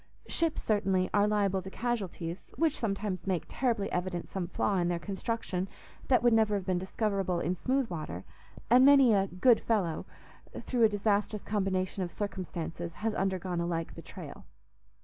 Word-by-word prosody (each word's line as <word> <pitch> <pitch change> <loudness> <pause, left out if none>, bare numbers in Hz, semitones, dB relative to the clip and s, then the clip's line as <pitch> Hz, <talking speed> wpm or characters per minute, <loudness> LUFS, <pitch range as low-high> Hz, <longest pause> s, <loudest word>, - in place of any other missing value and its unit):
Ships, 330 -2 0
certainly, 195 -4 +1
are 205 0 +4
liable 200 -2 +1
to 190 - -8
casualties, 190 -7 -3
which 320 -2 +2
sometimes 195 -4 -2
make 185 -3 0
terribly 235 -6 -1
evident 180 -1 -3
some 185 -3 -2
flaw 195 +3 0
in 175 -1 +1
their 175 -1 0
construction 195 0 -3 0.4
that 255 -2 +4
would 240 -1 +5
never 220 -2 +3
have 195 -2 -2
been 185 -1 +1
discoverable 190 -2 -1
in 175 - 0
smooth 255 +7 0
water; 155 - -5 0.4
and 250 +3 +6
many 275 -4 +7
a 195 -1 +3
"good 220 +7 +4
fellow," 195 -8 -1 0.5
through 240 -3 +2
a - - +5
disastrous 205 0 0
combination 190 -2 -1
of 180 - -2
circumstances, 175 -4 -5
has 220 +3 -2
undergone 185 -3 -1
a 170 - -1
like 165 -1 -2
betrayal. - - -10
195 Hz, 165 wpm, -30 LUFS, 180-220 Hz, 0.5 s, many